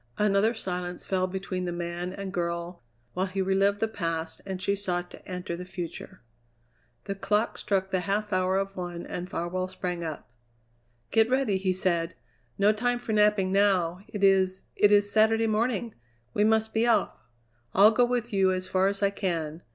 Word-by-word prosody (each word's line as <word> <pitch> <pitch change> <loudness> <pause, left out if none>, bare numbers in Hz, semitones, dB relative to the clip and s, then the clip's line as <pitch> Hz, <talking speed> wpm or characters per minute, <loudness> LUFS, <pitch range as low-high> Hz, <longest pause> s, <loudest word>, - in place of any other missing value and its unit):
Another 210 +2 +3
silence 180 -4 -4
fell 185 -1 0
between 185 -1 -4
the 175 - -2
man 175 +1 -4
and 195 0 -6
girl 170 -1 -3 0.3
while 185 +2 -1
he 190 +1 -5
relived 195 +1 +2
the 225 - +1
past 165 -5 -3
and 190 -1 -4
she 200 +2 0
sought 180 -3 -3
to - - -12
enter 180 -2 -4
the 180 - -6
future. 180 0 -7 0.8
The 195 - -3
clock 210 +3 0
struck 190 -1 -1
the 185 - +2
half 205 +3 -1
hour 185 +1 +2
of 195 0 -2
one 175 -1 -5
and 180 +1 -5
Farwell 180 +2 -2
sprang 180 -2 -4
up. 155 -2 -6 0.8
"Get 225 +1 +4
ready!" 260 -6 +2
he 190 0 0
said. 175 -2 0 0.4
"No 205 +2 +4
time 245 +3 0
for 235 -2 -4
napping 210 -3 +3
now. 190 -3 +2
It 205 -2 -5
is 190 -1 +3
it 205 - +4
is 205 0 +4
Saturday 225 +1 +4
morning! 225 +1 0 0.4
We 210 - +3
must 220 0 +2
be 225 +2 +2
off! 225 -4 +2 0.6
I'll 205 +3 +8
go 245 +2 +3
with 240 -1 -1
you 190 -1 +3
as 185 0 -2
far 190 0 +2
as 200 +1 -2
I 200 - +3
can. 165 -5 -3
190 Hz, 180 wpm, -27 LUFS, 180-210 Hz, 0.8 s, I'll